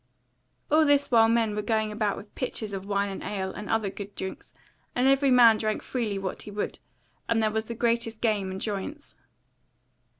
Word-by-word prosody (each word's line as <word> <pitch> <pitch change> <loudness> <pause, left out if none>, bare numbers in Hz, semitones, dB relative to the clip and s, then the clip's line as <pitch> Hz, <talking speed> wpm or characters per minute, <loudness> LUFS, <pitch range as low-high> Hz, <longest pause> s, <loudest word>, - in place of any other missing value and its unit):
All 315 +1 +6
this 285 -2 +3
while 225 -1 +6
men 225 -2 +2
were 210 - -1
going 220 0 0
about 210 -1 -1
with 205 - -11
pitchers 220 -5 -3
of 195 0 -5
wine 200 0 +1
and 195 - -6
ale, 190 -2 -3
and 210 - -7
other 220 -3 0
good 200 0 -8
drinks; 190 0 -6 0.4
and 250 +1 +3
every 275 +1 +4
man 240 -3 +7
drank 215 -1 -2
freely 225 -6 -2
what 190 -1 -4
he - - -9
would, 205 0 -4 0.5
and 230 -1 +3
there 215 - +2
was 220 +1 -1
the 235 - -6
greatest 230 -1 0
game 210 -5 0
and 190 0 -5
joyance. 215 +10 -5
215 Hz, 195 wpm, -27 LUFS, 200-235 Hz, 0.5 s, man